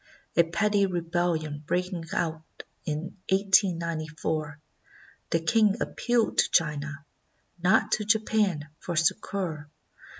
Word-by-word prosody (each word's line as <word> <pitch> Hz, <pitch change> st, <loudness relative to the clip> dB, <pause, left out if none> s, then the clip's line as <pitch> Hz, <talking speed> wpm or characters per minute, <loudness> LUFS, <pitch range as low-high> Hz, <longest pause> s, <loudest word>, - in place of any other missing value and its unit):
A 170 Hz, -, +7 dB
petty 200 Hz, +4 st, +2 dB
rebellion 170 Hz, -4 st, -1 dB
breaking 180 Hz, -2 st, -1 dB
out 160 Hz, -1 st, -3 dB, 0.2 s
in 155 Hz, +5 st, -4 dB
1894, 165 Hz, -6 st, +1 dB, 0.7 s
the 165 Hz, -, +2 dB
king 210 Hz, +4 st, +3 dB
ap -, -, -3 dB
pealed 240 Hz, -2 st, +1 dB
to -, -, +4 dB
China, 150 Hz, -2 st, 0 dB, 0.6 s
not 185 Hz, +5 st, +3 dB
to 215 Hz, -, +1 dB
Japan, 210 Hz, -7 st, +1 dB
for 175 Hz, -, -4 dB
succor. 165 Hz, -2 st, -1 dB
170 Hz, 105 wpm, -27 LUFS, 155-195 Hz, 0.7 s, A